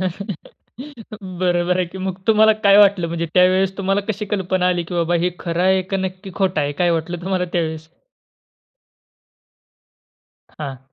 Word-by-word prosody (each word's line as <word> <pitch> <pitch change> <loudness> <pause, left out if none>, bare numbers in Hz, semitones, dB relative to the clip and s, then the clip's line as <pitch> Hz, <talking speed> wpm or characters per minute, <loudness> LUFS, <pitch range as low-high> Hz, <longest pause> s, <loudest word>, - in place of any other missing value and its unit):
बरोबर 185 - -4
आहे 185 - +1
की. 190 - -10
मग 190 0 -4
तुम्हाला 220 0 +5
काय 200 0 +7
वाटलं? 200 -4 +5
म्हणजे 170 0 -3
त्यावेळेस 185 +1 +3
तुम्हाला 195 +1 +1
कशी 210 0 -2
कल्पना 185 -2 0
आली, 175 -1 0
की 170 +2 -8
बाबा 170 0 0
हे 180 - +1
खरं 170 0 -2
आहे 190 0 +3
का - - +2
नक्की 190 +1 -5
खोटं 190 -5 0
आहे? 145 0 -1
काय 175 - +3
वाटलं 165 +1 -2
तुम्हाला 185 0 -1
त्यावेळेस? 160 -2 -2 2.7
हां. 140 -4 -6
185 Hz, 150 wpm, -20 LUFS, 175-195 Hz, 2.7 s, काय